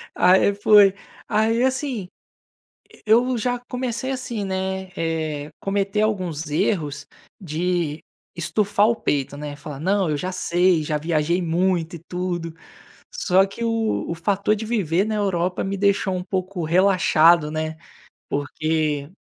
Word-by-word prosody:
Aí 190 +2 +4
foi 205 -1 +6 0.3
aí 225 +3 +2
assim, 260 -7 -1 0.8
e - - -19
e 250 +2 +4
já 245 +2 -1
comecei 250 0 -3
assim, 245 -5 -3
né, 190 0 -3
eh, 155 -3 -3
cometer 200 +1 -1
alguns 180 -8 -1
erros 145 -3 -1 0.3
de 170 -3 -2 0.3
estufar 205 +4 +1
o 235 - +2
peito, 140 - -2
né. 145 0 -6
Falar: 145 -1 -8
"Não, 190 +2 +1
eu 150 - 0
já 185 +5 -3
sei, 180 -2 +2
já 150 0 -1
viajei 160 +3 0
muito 175 0 0
e - - -8
tudo." 175 -2 -3 0.6
Só 190 - +3
que 200 +4 -7
o 225 -1 0
o 170 - -2
fator 200 +4 +1
de 220 +1 -5
viver 195 -5 +1
na 215 0 -2
Europa 185 -3 0
me 195 +1 -3
deixou 200 -1 +1
um 180 - -3
pouco 185 -1 -3
relaxado, 170 -3 +4
né, 155 0 -3 0.5
porque 150 0 -1
185 Hz, 140 wpm, -22 LUFS, 160-205 Hz, 0.8 s, foi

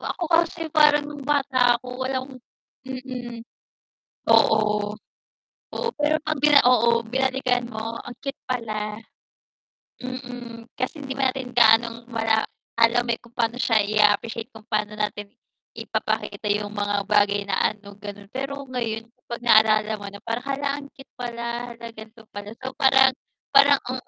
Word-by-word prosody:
Ako 350 - -4
kasi 330 -1 +1
parang 300 -1 +5
nung 290 - -8
bata 265 -4 +3
ako 250 +1 -5
walang 260 0 -4 0.5
mm. 250 -3 -6 0.9
Oo. 210 -1 +3 0.8
Oo, 470 - -2
pero 305 +1 +1
'pag 310 0 -2
bina 290 0 +6
oo 235 -1 +4
binalikan 255 +1 0
mo 225 +1 -4
ang 245 - -7
cute 275 0 -5
pala. 215 -3 -3 1.0
Mm, 245 -2 -8
kasi 260 +4 -3
hindi 265 -1 -6
pa 265 -1 +2
natin 260 -2 -5
gaanong 235 0 +4
mala 225 -2 +1 0.3
alam, 235 +1 +3
eh, 230 - 0
kung 235 0 -21
pa'no 235 0 0
siya 225 -4 +3
ia-appreciate 210 +2 +1
kung 220 - -12
pa'no 210 0 -1
natin 205 0 -4 0.4
ipapakita - - -3
yung 205 0 0
mga 205 -1 -1
bagay 205 -1 +3
na 200 +1 +1
ano, 200 -1 -15
gano'n. 205 0 -9
Pero 275 +2 -4
ngayon 230 -2 -3
kapag 240 -1 -8
naalala 215 -2 +5
mo 205 - -8
na 200 0 -10
parang, 230 +3 -4
"Hala, 280 +1 -1
ang 285 - -9
cute 270 -3 -15
pala, 235 0 -4
'la 230 0 -9
gan'to 220 +1 -13
pala." 205 +1 -8
So 260 - -3
parang 265 0 +6 0.4
parang - - +6
ang - - -4
235 Hz, 150 wpm, -24 LUFS, 215-260 Hz, 1.0 s, bina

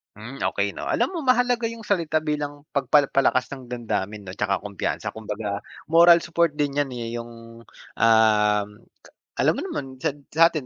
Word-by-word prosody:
Hmm, - - -9
okay - - 0
'no, - - -7
alam - - +1
mo 345 - -4
mahalaga 245 -2 +2
yung 230 -1 -8
salita 160 -6 0
bilang 145 -1 -3
pagpal 140 0 +3
palakas 130 -1 +2
ng 130 -3 -10
damdamin, 110 -4 -3
'no, 90 - -7
tsaka 100 -2 0
kumpiyansa 100 -2 -3
kumbaga 105 -2 -4 0.3
moral 170 0 +7
support 170 -2 +1
din 145 -1 -1
yan, 145 -2 0
eh, 115 -1 -5
yung, 115 0 -10 0.4
um, 105 -2 +4 0.7
alam - - +3
mo - - -4
naman 340 - -4 0.2
sat 145 - -1 0.2
satin 165 -3 +4
135 Hz, 165 wpm, -24 LUFS, 110-165 Hz, 0.7 s, moral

